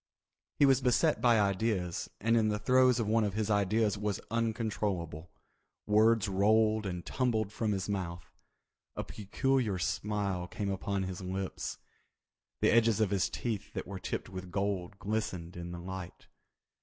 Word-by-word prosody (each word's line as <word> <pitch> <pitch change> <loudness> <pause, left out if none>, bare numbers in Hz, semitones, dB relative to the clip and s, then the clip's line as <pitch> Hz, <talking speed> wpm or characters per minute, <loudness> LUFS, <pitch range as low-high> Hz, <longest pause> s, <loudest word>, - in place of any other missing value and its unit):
He 145 - +6
was 135 -1 +4
beset 130 +5 +2
by 120 -3 +5
ideas 100 -3 0
and 115 +2 +2
in 110 -2 +3
the 105 - 0
throes 125 +2 +4
of 115 - +1
one 110 +2 +2
of 100 -2 -1
his 110 0 0
ideas 105 +1 +2
was 105 -1 -1
uncontrollable. 105 -8 -2 0.6
Words 110 +1 +4
rolled 110 +2 +3
and 90 -2 -5
tumbled 110 -6 0
from 110 -1 -1
his 95 -2 -2
mouth. 90 -4 -4 0.6
A - - -3
peculiar 110 0 0
smile 100 -1 -1
came 100 +2 -3
upon 100 0 -2
his 95 0 -5
lips. 95 +1 -4 0.8
The - - +4
edges 115 -1 +4
of 105 -3 +2
his 100 -3 +1
teeth 110 -5 -4
that - - -4
were 100 -2 -6
tipped - - -4
with 95 -1 -7
gold 100 -1 -2
glistened 100 -5 -3
in 85 0 -6
the 85 - -6
light. 90 0 -7
105 Hz, 155 wpm, -31 LUFS, 95-110 Hz, 0.8 s, He